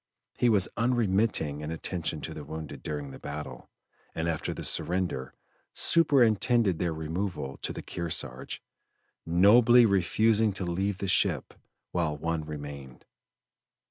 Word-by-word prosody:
He 125 - +4
was 100 -4 +4
unremitting 105 - +1
in 75 - -5
attention 80 -1 -3
to 80 - -5
the 75 - -7
wounded 80 +1 -7
during 75 -2 -5
the - - -10
battle, 75 +1 -7 0.5
and 80 +1 -1
after 80 -2 -2
the - - -6
surrender, 85 -8 -1 0.4
superintended 120 - +3
their 85 -2 0
removal 80 -2 -4
to - - -3
the - - -7
Kearsarge, 75 -7 -4 0.6
nobly 115 +8 +6
refusing 110 +2 +3
to 95 - -3
leave 95 +3 -1
the 100 - -3
ship 90 - +1 0.4
while 80 -4 -1
one 80 +1 -2
remained. 70 -4 -8
85 Hz, 130 wpm, -28 LUFS, 75-105 Hz, 0.6 s, nobly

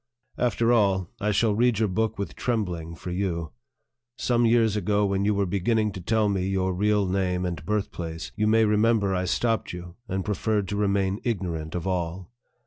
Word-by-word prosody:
After 120 0 +2
all, 95 -5 +2
I 105 - 0
shall 105 +1 +2
read 120 +1 +2
your 110 0 +2
book 110 +4 -1
with 100 - -4
trembling 90 -9 -2
for 90 - -7
you. 90 -3 -2 0.7
Some 120 -1 +2
years 115 -2 +3
ago, 105 0 +1
when 100 0 0
you 105 0 +2
were 100 0 +1
beginning 105 +4 +1
to 95 - -7
tell 110 +4 +1
me 95 -2 0
your 95 -1 0
real 105 +2 +2
name 90 -1 0
and 85 -4 -4
birthplace, 85 -5 -3
you 105 0 +1
may 110 +1 +4
remember 105 -1 +2
I 90 0 0
stopped 115 +4 0
you, 90 0 -9
and 95 -1 -2
preferred 105 -1 0
to 105 - -2
remain 100 -1 +1
ignorant 85 -9 -3
of 85 - -3
all. 90 +1 -3
100 Hz, 185 wpm, -26 LUFS, 90-110 Hz, 0.7 s, may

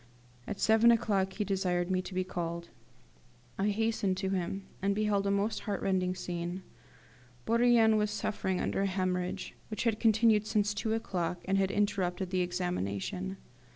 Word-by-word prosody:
At 205 - -4
seven 220 +1 +5
o'clock 200 -4 +2
he 210 - -1
desired 185 -2 0
me 185 0 +2
to 185 0 -8
be 185 - +1
called. 170 -2 -4 0.9
I 200 +2 +2
hastened 210 -3 0
to 190 0 -1
him, 190 +1 -2 0.2
and 200 +1 +1
beheld 205 -2 +1
a - - +2
most 200 +2 0
heart 205 -3 -3
rending 185 -1 +1
scene. 175 0 -4 0.8
Bourrienne 230 -1 +4
was 210 0 +1
suffering 200 -3 -2
under - - -1
a 200 - +2
hemorrhage, 185 -1 -2
which 215 - -3
had 225 -2 +1
continued 220 -1 +4
since 210 -1 +1
two 220 +1 -1
o'clock, 180 -5 -2
and 195 0 +2
had 190 -1 +2
interrupted 190 -2 0
the 185 -1 +1
examination. 180 - -2
195 Hz, 160 wpm, -31 LUFS, 180-210 Hz, 0.9 s, seven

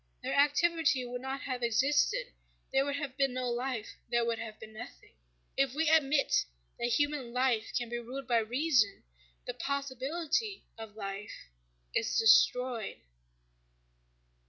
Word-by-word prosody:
Their - - -2
activity 295 -1 +3
would 245 0 -5
not 265 +1 -4
have 255 -2 -4
existed: 290 - +2 0.4
there 270 0 +4
would 285 0 -1
have 285 -3 -4
been 275 -2 +2
no 250 -1 -1
life, 245 -2 -2 0.2
there 235 0 +2
would 230 -1 -1
have 220 -1 -7
been 220 0 -11
nothing. 240 +3 -11 0.4
If 270 -1 +1
we 320 +1 +2
admit 295 -3 +3 0.4
that 235 - 0
human 290 -1 0
life 250 -3 +1
can 240 -1 -2
be 240 +1 -3
ruled 255 +3 -7
by 235 -2 +3
reason, 240 -2 +1 0.4
the - - -3
possibility 280 - -2
of 225 -2 -10
life 195 - -7 0.4
is - - 0
destroyed. 230 +1 +4
255 Hz, 140 wpm, -31 LUFS, 235-285 Hz, 0.4 s, there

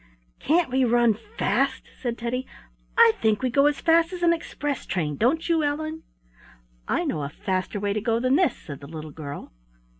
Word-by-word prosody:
"Can't 320 -1 +2
we 260 +1 +2
run 240 -1 +4
fast?" 240 +5 -1 0.2
said 240 -2 -2
Teddy. 245 +2 -3 0.5
"I 460 0 +8
think 220 +2 +2
we 255 - +1
go 275 +3 +4
as 295 -1 0
fast 330 +1 +4
as 360 -1 -5
an 340 0 +5
express 290 -3 -4
train; 165 -5 -1
don't 265 - +1
you, 330 -2 +2
Ellen?" 310 +2 -2 0.9
"I - - 0
know 150 - -2
a 140 - -3
faster 185 +5 -3
way 200 0 -1
to 215 - -2
go 230 +1 +1
than 255 +2 +2
this," 315 -7 +2
said 140 -4 -9
the 140 - -11
little 155 0 -8
girl. 145 -1 -8
250 Hz, 190 wpm, -25 LUFS, 200-305 Hz, 0.9 s, I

